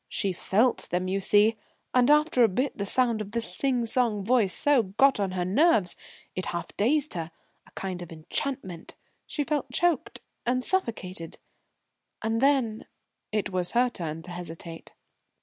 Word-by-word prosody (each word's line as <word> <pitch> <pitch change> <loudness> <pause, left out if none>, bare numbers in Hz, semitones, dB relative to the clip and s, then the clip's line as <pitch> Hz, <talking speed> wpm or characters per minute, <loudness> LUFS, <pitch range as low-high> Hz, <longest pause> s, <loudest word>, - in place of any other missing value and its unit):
She 195 -2 -1
felt 220 +7 +1
them, 180 +1 -1
you 195 +1 0
see. 210 +3 +4 0.4
And 250 +1 +4
after 300 -4 +4
a - - +7
bit 255 +8 -1
the 200 -2 -3
sound 235 -1 +2
of 205 0 -7
this 230 -6 -1
sing 250 -2 +1
song 225 -3 +1
voice 230 -4 +3
so 290 +2 +3
got 225 +6 +3
on 195 -2 -1
her 180 -1 -1
nerves, 210 - +3 0.4
it 185 - -4
half 170 - -5
dazed 285 +7 +1
her 165 -2 -4 0.4
a - - -20
kind 185 -2 -5
of 175 - -9
enchantment 175 - -5 0.3
she 295 - -2
felt 290 -4 -2
choked 335 +1 +1 0.2
and 255 +1 +1
suffocated. 190 - -1 0.9
And 225 +1 0
then 265 -6 +2 0.2
" - - -55
It 210 -2 -1
was 180 -1 -1
her 245 +1 +3
turn 165 -5 -5
to 180 - -8
hesitate. 165 -1 -8
220 Hz, 165 wpm, -27 LUFS, 185-255 Hz, 0.9 s, a